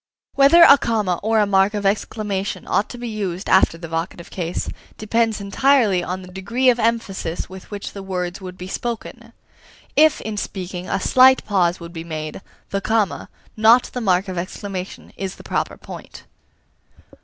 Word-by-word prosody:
Whether 280 +5 +7
a 280 -4 +8
comma 210 -7 0
or 220 +2 +1
a 210 - +4
mark 195 +1 +2
of 205 -1 -3
exclamation 200 0 -2
ought 205 - +1
to 245 - -8
be 240 0 -6
used 200 -4 -4
after 190 -3 +4
the 165 0 -8
vocative 165 +1 -5
case, 175 -1 -3 0.3
depends 225 0 0
entirely 205 -2 +2
on 185 +2 -4
the - - -11
degree 235 +8 +2
of 240 - -3
emphasis 220 -7 -1
with 190 0 -11
which 205 -1 -6
the 200 - -7
words 180 0 -4
would 185 -1 -8
be 180 - -7
spoken. 235 +2 -5 0.6
If, 310 -1 +5
in 215 -1 -5
speaking, 185 -2 -5
a - - 0
slight 260 +6 +5
pause 180 -4 +1
would 170 0 -10
be 165 -1 -6
made, 155 0 -6 0.3
the 195 - -1
comma, 215 -2 0 0.3
not 225 +3 +5
the 250 - -3
mark 190 -2 +2
of 185 -2 -3
exclamation, 185 +1 -6
is 195 -1 -4
the - - -14
proper - - -2
point. - - -11
195 Hz, 175 wpm, -21 LUFS, 180-225 Hz, 0.6 s, a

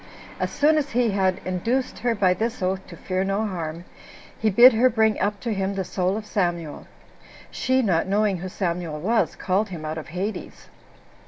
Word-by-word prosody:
As - - -1
soon 305 +1 +3
as 290 -1 -3
he 240 -2 +2
had 190 -2 +1
induced 230 +9 -1
her 240 -1 0
by 190 -3 +3
this 225 +3 -3
oath 190 +1 -2
to 170 - -11
fear 185 +4 -2
no 195 +3 0
harm, 170 -3 -5 0.5
he 220 - +2
bid 240 +5 +8
her 245 +3 +4
bring 220 -2 +2
up 205 0 -1
to 235 -3 -2
him 195 0 -2
the 195 - -1
soul 185 +2 -1
of 220 - -6
Samuel. 175 -7 -2 0.6
She, 260 0 +1
not 180 -5 +1
knowing 200 0 +1
who 185 +2 -5
Samuel 170 -4 -3
was, 225 +8 +1
called 195 +3 0
him 165 -4 -7
out 155 +1 -3
of 155 - -9
Hades. 190 +6 -5
195 Hz, 190 wpm, -24 LUFS, 180-220 Hz, 0.6 s, bid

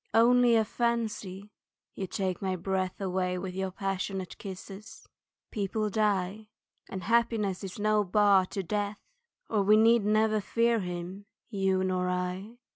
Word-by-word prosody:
Only 240 +1 +5
a 220 -1 +3
fancy 215 -4 -2 0.4
(you 190 - -4
take 185 -1 -2
my 190 -1 -1
breath 185 +1 -2
With 185 -1 -2
your 190 0 -2
passionate 195 -1 -3
kisses) 195 +2 -9 0.4
people 210 +1 -2
die, 210 0 0 0.4
And 190 -1 -6
happiness 225 -3 +1
is 190 -1 -6
no 215 0 +2
bar 200 -1 +4
to 195 - -4
death 205 +2 -2 0.5
Or 215 -2 +1
we 210 +2 +5
never 220 -1 +4
need 210 - -3
fear 230 +2 +2
him, 180 +2 -6 0.2
you 190 -2 +1
nor 185 -1 0
I. 180 +5 -3
195 Hz, 135 wpm, -29 LUFS, 185-215 Hz, 0.5 s, Only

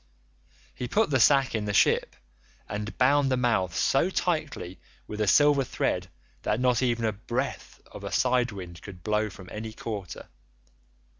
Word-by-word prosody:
He 125 - -5
put 210 - +1
the 130 - +3
sack 135 +2 +4
in 110 -2 -1
the 105 -1 -2
ship - - +3 0.5
and 105 +1 -5
bound 135 +2 +4
the 130 - +1
mouth 105 -9 +1
so 115 - +2
tightly 155 - -2 0.3
with 105 0 -5
a 105 - +1
silver 145 +6 +5
thread - - -1 0.3
that 105 - 0
not 125 -1 +2
even 120 -2 +1
a 110 - +2
breath 100 0 -4
of - - -11
a - - -5
side 125 -1 +2
wind 90 -4 -9
could 90 -4 -11
blow 105 0 0
from 95 -1 -12
any 110 +1 -6
quarter. 100 -6 -6
110 Hz, 165 wpm, -27 LUFS, 105-130 Hz, 0.5 s, silver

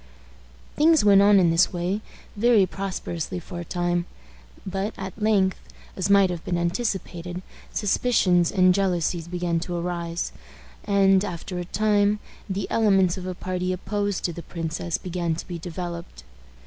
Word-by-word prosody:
Things 315 -4 +4
went 200 -1 +7
on 200 0 +6
in 175 -3 +4
this 165 +2 +4
way 180 +3 -2 0.3
very 220 -2 +4
prosperously 185 -3 -4
for 175 +1 -8
a - - -4
time; 175 0 -1 0.6
but 195 +3 -3
at 190 +2 -7
length, 200 -3 +2 0.4
as 190 0 -1
might 200 -2 +5
have 170 -2 -5
been 175 - -1
anticipated, 180 -1 -3 0.3
suspicions 190 -5 +2
and 185 -2 +5
jealousies 175 -3 0
began 175 -1 -1
to 175 +1 -4
arise, 170 -1 -3 0.5
and, 195 -1 +4
after 180 -1 -5
a 175 - -4
time, 205 +2 +2 0.3
the 195 0 -2
elements 195 -5 +3
of 185 -1 -6
a 185 - -4
party 185 0 -2
opposed 205 +2 -2
to 175 - -1
the 170 - -7
princess 165 0 -3
began 175 -2 -2
to - - -7
be 175 -2 -5
developed. 170 - -7
185 Hz, 150 wpm, -24 LUFS, 175-200 Hz, 0.6 s, went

